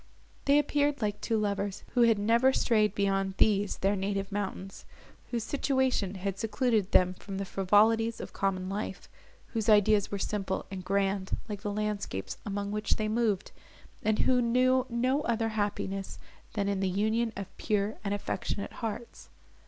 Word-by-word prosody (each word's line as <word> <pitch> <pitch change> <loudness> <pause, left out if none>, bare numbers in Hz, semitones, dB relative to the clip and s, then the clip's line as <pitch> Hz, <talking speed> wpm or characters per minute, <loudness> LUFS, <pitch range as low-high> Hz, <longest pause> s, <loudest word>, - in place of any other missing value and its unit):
They 280 +1 +5
appeared 290 -2 +1
like 205 -1 -1
two 225 - 0
lovers 200 -1 -2
who 245 - +3
had 230 -2 +5
never 230 +5 +4
strayed 215 -5 +2
beyond 195 -1 0
these 205 -1 +2
their 195 +2 +1
native 195 0 -2
mountains; 195 -1 -4 0.5
whose 235 -2 -2
situation 260 -6 0
had 195 +1 -3
secluded 220 -2 +1
them 185 0 +4
from 195 +1 -7
the 195 - -2
frivolities 220 +4 +3
of - - -7
common 185 -1 -1
life, 200 +3 -4 0.4
whose 225 -1 -1
ideas 210 -1 +5
were 200 - -3
simple 195 -1 -2
and 190 -1 -5
grand, 195 0 0
like 205 -3 -5
the 205 -1 -3
landscapes 200 - -3
among 200 0 -2
which 210 0 0
they 215 - -1
moved, 220 -4 0 0.5
and 215 0 +1
who 255 -1 +3
knew 255 +2 +3
no 255 +4 +1
other 230 -4 0
happiness, 200 -2 -2 0.4
than 205 -2 -1
in 200 -1 0
the 190 -1 +1
union 220 +4 +1
of 195 -1 -7
pure 210 0 0
and 200 - -2
affectionate 200 0 -3
hearts. 230 +1 -6
205 Hz, 160 wpm, -29 LUFS, 195-230 Hz, 0.5 s, They